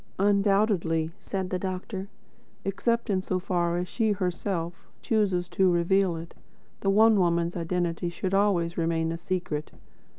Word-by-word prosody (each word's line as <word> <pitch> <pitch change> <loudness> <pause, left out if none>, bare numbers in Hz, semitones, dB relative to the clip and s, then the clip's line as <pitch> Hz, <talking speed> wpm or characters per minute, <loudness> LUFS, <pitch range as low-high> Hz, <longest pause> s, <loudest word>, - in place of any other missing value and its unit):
"Undoubtedly," 195 -5 +2
said 190 -2 -4
the 185 - 0
doctor. 190 +1 -4 0.6
"Except 235 +4 0
in 190 -1 +1
so 185 0 -1
far 175 -2 0
as 180 +1 -2
she 220 +1 +1
herself, 180 -2 -3 0.2
chooses 195 -6 +1
to 185 0 +3
reveal 175 +1 +2
it, 165 +1 -8 0.5
the 195 - 0
One 215 +1 +5
Woman's 170 -1 +1
identity 175 0 -1
should 185 +2 -3
always 180 -4 +2
remain 165 0 0
a 165 - -3
secret. 175 -4 -3
185 Hz, 140 wpm, -27 LUFS, 170-195 Hz, 0.6 s, One